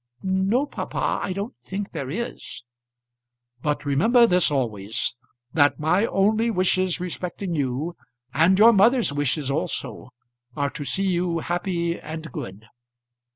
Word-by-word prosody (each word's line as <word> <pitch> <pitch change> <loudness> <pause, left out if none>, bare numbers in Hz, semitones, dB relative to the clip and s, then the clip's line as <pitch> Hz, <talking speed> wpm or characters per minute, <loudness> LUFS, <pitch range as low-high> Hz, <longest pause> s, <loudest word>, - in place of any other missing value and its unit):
"No, 190 +8 +1
papa, - - -2
I - - -2
don't 200 +6 -4
think 195 +1 -5
there 130 - -5
is." 230 - -5 1.0
"But 150 +1 -1
remember 225 - +4
this 180 -5 +3
always; 110 -5 -2 0.4
that 145 -3 +3
my 180 +8 +2
only 215 +4 +2
wishes 185 -3 +1
respecting 180 +1 -4
you, 145 +3 -2 0.4
and 180 +4 +4
your 225 +3 +8
mother's 225 - +4
wishes 145 0 0
also, 140 - -3 0.5
are 140 -1 -1
to 145 - -6
see 190 +9 0
you 175 -2 0
happy 170 0 -2
and 160 0 -7
good." 100 0 -7
175 Hz, 130 wpm, -24 LUFS, 145-195 Hz, 1.0 s, your